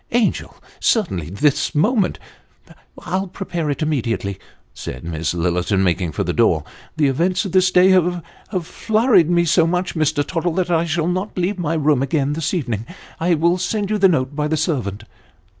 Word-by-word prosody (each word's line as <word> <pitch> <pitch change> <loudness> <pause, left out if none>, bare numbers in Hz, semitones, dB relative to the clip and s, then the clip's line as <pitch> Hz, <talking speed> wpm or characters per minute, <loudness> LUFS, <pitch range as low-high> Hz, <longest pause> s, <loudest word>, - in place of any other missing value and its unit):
" - - -39
Angel! 235 -2 0 0.2
Certainly 95 - 0
this 145 - 0
moment! 205 - +2 0.3
" - - -22
" - - -33
I'll 190 +1 -1
prepare 175 -4 -4
it 145 +3 -2
immediately," 115 -9 -2 0.3
said 65 - -7
Miss 80 0 -3
Lillerton, 90 +3 0
making 90 -2 0
for - - -1
the - - -2
door; - - +2 0.2
" - - -25
the 155 - +3
events 175 +9 +1
of 195 - -4
this 185 0 +4
day 185 +1 +5
have 180 -2 +2 0.4
flurried 215 - +2
me 170 -1 +3
so 165 0 +3
much, 180 +2 -1
Mr. 155 -2 0
Tottle, 170 -1 -2
that 180 0 -1
I 165 0 +2
shall 165 -1 -1
not 185 +4 -3
leave 185 +2 -1
my 165 -1 -1
room 150 -4 +2
again 140 0 0
this 160 0 -2
evening; 120 - -3 0.3
I 170 +1 +2
will 170 +3 +2
send 205 +2 -2
you 210 - 0
the 195 -1 +6
note 135 -4 0
by 150 0 0
the 160 +1 0
servant." 125 - -2
165 Hz, 190 wpm, -20 LUFS, 135-185 Hz, 0.4 s, the